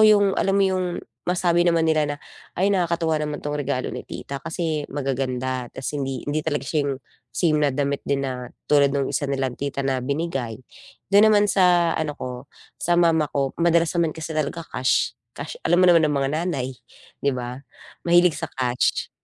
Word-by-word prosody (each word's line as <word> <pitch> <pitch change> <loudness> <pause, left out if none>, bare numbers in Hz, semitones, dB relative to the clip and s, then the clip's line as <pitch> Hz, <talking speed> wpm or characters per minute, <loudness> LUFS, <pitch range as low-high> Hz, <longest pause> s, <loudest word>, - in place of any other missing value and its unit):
yung 205 -1 +6
alam 195 - +1
mo 200 - +4
yung 185 -1 +1 0.4
masabi 175 -1 +2
naman 170 -1 +3
nila 155 -1 +3
na, - - -11 0.4
"Ay 190 +3 +2
nakakatuwa 170 -4 +1
naman 150 -1 -3
tong 150 0 -3
regalo 135 -2 -2
ni - - -6
tita 140 - -6
kasi 160 -1 -3
magaganda". 130 -2 -2
Tas 130 - -4
hindi 135 -3 -3
hindi 155 +1 -1
talaga 145 -3 0
siya 150 -3 0
yung 135 -2 -3 0.3
same 155 -3 +2
na 145 -1 +3
damit 140 0 0
din 140 -1 0
na, 125 -2 -4 0.2
tulad 140 -1 +4
nung 140 -1 0
isa 145 - -1
nilang 135 -2 -2
tita 140 0 -3
na 135 -1 0
binigay. 135 -6 -3 0.5
Dun 205 +2 +7
naman 205 -1 +4
sa 175 -3 +4
ano 155 -2 -2
ko, 125 -1 -7 0.3
sa 175 - +1
mama 165 -3 +3
ko 140 -1 +1
madalas 170 -1 +3
naman 165 -2 +1
kasi 160 0 -6
talaga 155 +2 -2
cash, 130 +1 +1 0.2
cash, 480 - -7
alam 175 +1 +4
mo 180 - +7
naman 165 -2 +5
ng 150 - 0
mga 135 - 0 0.2
nanay, 140 -8 -2 0.6
'di 140 - +3
ba? 125 0 -5 0.5
Mahilig 175 -2 +4
sa - - -3
cash. 125 -2 0
150 Hz, 185 wpm, -23 LUFS, 135-170 Hz, 0.6 s, Dun